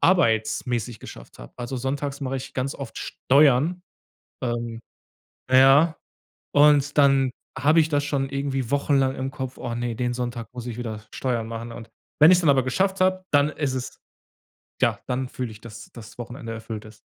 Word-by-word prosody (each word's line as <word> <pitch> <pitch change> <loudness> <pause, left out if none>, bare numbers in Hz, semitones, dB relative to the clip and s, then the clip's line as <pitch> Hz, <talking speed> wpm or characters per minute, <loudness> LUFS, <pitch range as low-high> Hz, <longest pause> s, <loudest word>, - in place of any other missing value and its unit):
arbeitsmäßig 120 - +1
geschafft - - -12
habe. - - -11
Also 120 +2 -5
sonntags 140 +2 -3
mache 135 -1 -2
ich 130 0 -8
ganz 130 +2 -2
oft 140 - -7
Steuern, 145 +5 +3 0.6
ähm, 120 -2 -3 0.7
na 130 - +5
ja, 145 +5 +6 0.6
und 145 0 +5
dann 135 -2 +4 0.3
habe 155 +3 +4
ich 160 - +2
das 145 -2 0
schon 135 -2 -1
irgendwie 135 -3 -2
wochenlang 140 -2 +2
im 130 +1 -3
Kopf: 130 -1 -6
„Oh 120 -1 -4
ne, 120 0 -2
den 120 0 -1
Sonntag 120 -2 -4
muss 125 -1 -7
ich 120 -2 -5
wieder 110 -3 -5
Steuern 120 -4 -2
machen” 115 +1 -6
und 115 -1 -10 0.3
wenn 155 +3 +9
ich 185 - +7
es - - +1
dann 160 - +4
aber 135 -3 +3
geschafft 190 +9 0
habe, 185 0 +2
dann 145 0 +4
ist 145 -4 -2
es 130 -1 -5 0.8
ja, - - +2
dann 130 +1 -2
fühle 125 -2 -5
ich, 105 - -14
dass 110 -1 -11
das 115 0 -12
Wochenende 120 -1 -7
erfüllt 110 -1 -7
ist. 110 0 -14
130 Hz, 180 wpm, -24 LUFS, 120-145 Hz, 0.8 s, wenn